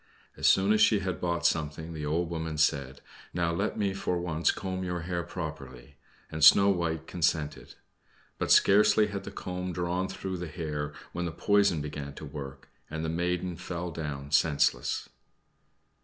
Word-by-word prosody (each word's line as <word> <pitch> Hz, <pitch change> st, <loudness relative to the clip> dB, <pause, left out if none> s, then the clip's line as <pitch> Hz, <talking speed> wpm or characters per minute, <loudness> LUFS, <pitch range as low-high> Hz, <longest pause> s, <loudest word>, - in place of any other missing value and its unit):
As -, -, +1 dB
soon 100 Hz, +2 st, +5 dB
as 110 Hz, -, +2 dB
she 110 Hz, -1 st, +5 dB
had 95 Hz, -1 st, -3 dB
bought 85 Hz, -1 st, -1 dB
something 80 Hz, +1 st, 0 dB
the 75 Hz, -2 st, -4 dB
old 85 Hz, +3 st, 0 dB
woman 80 Hz, -2 st, -3 dB
said, 70 Hz, -3 st, +1 dB, 0.3 s
"Now 85 Hz, -1 st, +1 dB
let 100 Hz, +5 st, -1 dB
me 100 Hz, -2 st, 0 dB
for 90 Hz, -2 st, -1 dB
once 85 Hz, -1 st, 0 dB
comb 95 Hz, -1 st, -2 dB
your 90 Hz, -1 st, -3 dB
hair 85 Hz, +1 st, -2 dB
properly," 80 Hz, -7 st, -7 dB, 0.4 s
and 80 Hz, -1 st, -3 dB
Snow 100 Hz, +6 st, +8 dB
White 85 Hz, -4 st, -1 dB
consented. 80 Hz, -3 st, -1 dB, 0.6 s
But -, -, 0 dB
scarcely 105 Hz, +1 st, +6 dB
was 100 Hz, -1 st, -3 dB
the -, -, -8 dB
comb 90 Hz, 0 st, -5 dB
drawn 90 Hz, +2 st, -1 dB
through 95 Hz, -1 st, -5 dB
the 90 Hz, 0 st, -5 dB
hair 75 Hz, -2 st, -4 dB, 0.2 s
when 90 Hz, 0 st, -2 dB
the 85 Hz, -, -2 dB
poison 100 Hz, -1 st, +2 dB
began 70 Hz, -1 st, -6 dB
to 75 Hz, -, -8 dB
work, 70 Hz, -2 st, -8 dB, 0.2 s
and 80 Hz, +1 st, -4 dB
the -, -, -1 dB
maiden 90 Hz, +1 st, -1 dB
fell 85 Hz, 0 st, -5 dB
down 75 Hz, -3 st, -5 dB
senseless. 70 Hz, -4 st, +2 dB
85 Hz, 170 wpm, -29 LUFS, 75-90 Hz, 0.6 s, Snow